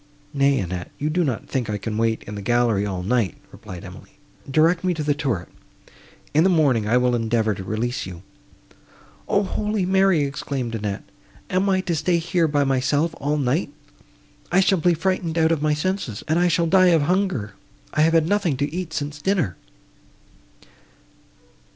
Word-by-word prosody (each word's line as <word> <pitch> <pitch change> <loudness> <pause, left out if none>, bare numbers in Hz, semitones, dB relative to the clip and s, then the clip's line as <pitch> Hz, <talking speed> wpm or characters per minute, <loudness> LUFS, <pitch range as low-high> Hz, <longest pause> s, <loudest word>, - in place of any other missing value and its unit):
"Nay, 140 -1 +3
Annette, 90 -4 -4
you 150 +2 -1
do 175 +3 +1
not 130 -8 -2
think 125 -5 -2
I 105 - -1
can 105 +2 -4
wait 115 0 0
in 105 - -8
the 100 - -5
gallery 115 -2 +1
all 95 -2 -4
night," 105 -2 0 0.2
replied 90 +1 -10
Emily. 90 -2 -12 0.4
"Direct 165 +5 +3
me 180 -1 +1
to 155 - -3
the 145 0 +2
turret; 130 -11 -2 0.9
in 155 +2 +4
the 190 - +4
morning 140 - +2
I 120 +3 +3
will 125 0 +2
endeavour 115 -2 +1
to 95 - -7
release 110 +3 -2
you." 90 -1 -9 1.0
"O 200 - +2
holy 210 0 -1
Mary!" 190 -4 +3
exclaimed 140 -3 -3
Annette, 105 -3 -3 0.5
"am 190 +2 +2
I 190 -1 +2
to 175 -3 -2
stay 170 +3 +1
here 170 0 +1
by 145 -1 +1
myself 140 +4 +1
all 145 +2 0
night! 140 +3 0 0.8
I 180 - +4
shall 190 -1 +3
be 175 +1 +3
frightened 170 -1 -1
out 160 0 +3
of 160 -3 0
my 150 0 +2
senses, 150 - -3
and 160 +2 +2
I 175 - +3
shall 170 0 +2
die 185 +2 +5
of 165 -4 +4
hunger; 180 - 0 0.4
I - - +2
have 165 +1 +4
had 165 -1 +3
nothing 185 -8 +1
to 145 +2 -2
eat 175 -2 -4
since 145 0 -4
dinner!" 180 - 0
145 Hz, 180 wpm, -22 LUFS, 115-175 Hz, 1.0 s, die